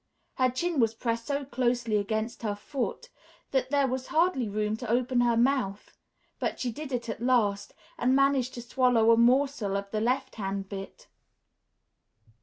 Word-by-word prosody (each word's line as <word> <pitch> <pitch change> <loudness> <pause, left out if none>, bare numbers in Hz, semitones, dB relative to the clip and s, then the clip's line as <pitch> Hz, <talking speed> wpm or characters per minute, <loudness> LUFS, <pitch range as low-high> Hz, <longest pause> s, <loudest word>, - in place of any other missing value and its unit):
Her 255 -1 +3
chin 315 +5 -1
was 225 -2 +2
pressed 230 0 -2
so 280 -1 -1
closely 240 -3 0
against 220 +3 -2
her 210 -3 -2
foot 275 - -4 0.4
that 265 -1 0
there 285 -1 +3
was 260 0 -3
hardly 315 - +1
room 210 +1 -1
to - - -6
open 245 +1 +2
her 235 -1 +2
mouth; 240 -5 0 0.4
but - - -2
she 245 - -1
did 290 +4 -7
it 240 -2 -2
at 225 - -5
last 220 -5 +1 0.2
and 255 +2 +3
managed 275 -2 +2
to 240 - -6
swallow 245 -2 +3
a - - +7
morsel 245 -4 +2
of 200 0 -6
the 215 - -1
left 250 +3 -1
hand 195 -1 -3
bit.... 195 -1 -8
240 Hz, 170 wpm, -28 LUFS, 220-265 Hz, 0.4 s, a